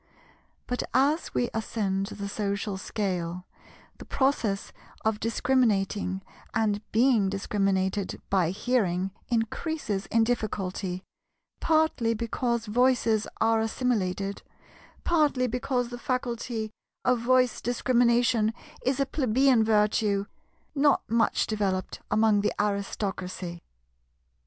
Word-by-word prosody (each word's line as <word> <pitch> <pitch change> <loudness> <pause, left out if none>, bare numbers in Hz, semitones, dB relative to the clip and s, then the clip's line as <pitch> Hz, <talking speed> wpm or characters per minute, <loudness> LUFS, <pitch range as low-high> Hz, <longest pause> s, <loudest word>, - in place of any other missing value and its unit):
But 250 - -2
as 290 +5 +2
we 245 - +1
ascend 200 -3 -1
the 205 -1 -6
social 200 0 -2
scale, 180 -3 -3 0.5
the - - -8
process 245 -8 0 0.3
of 220 -1 +1
discriminating 210 -5 +1 0.3
and 210 -2 +1
being 225 -4 +4
discriminated 195 -1 -1
by 185 -4 +3
hearing 195 -3 0 0.2
increases 225 - -2
in 225 0 +3
difficulty, 195 -5 -2 0.6
partly 310 -8 +2
because 235 +1 -1
voices 230 -1 +2
are 225 0 +3
assimilated, 200 -5 -1 0.6
partly 295 -6 +2
because 250 0 -1
the 245 0 -7
faculty 235 -3 -2 0.3
of 250 -1 +3
voice 250 0 +2
discrimination 240 -2 +2 0.3
is 260 +2 0
a 275 - +3
plebeian 260 -3 +3
virtue 210 -2 +2 0.5
not 285 -1 +3
much 230 0 +2
developed 195 -3 -2
among 210 -1 +3
the 210 - +1
Aristocracy. 195 -3 -3
220 Hz, 100 wpm, -27 LUFS, 200-245 Hz, 0.6 s, being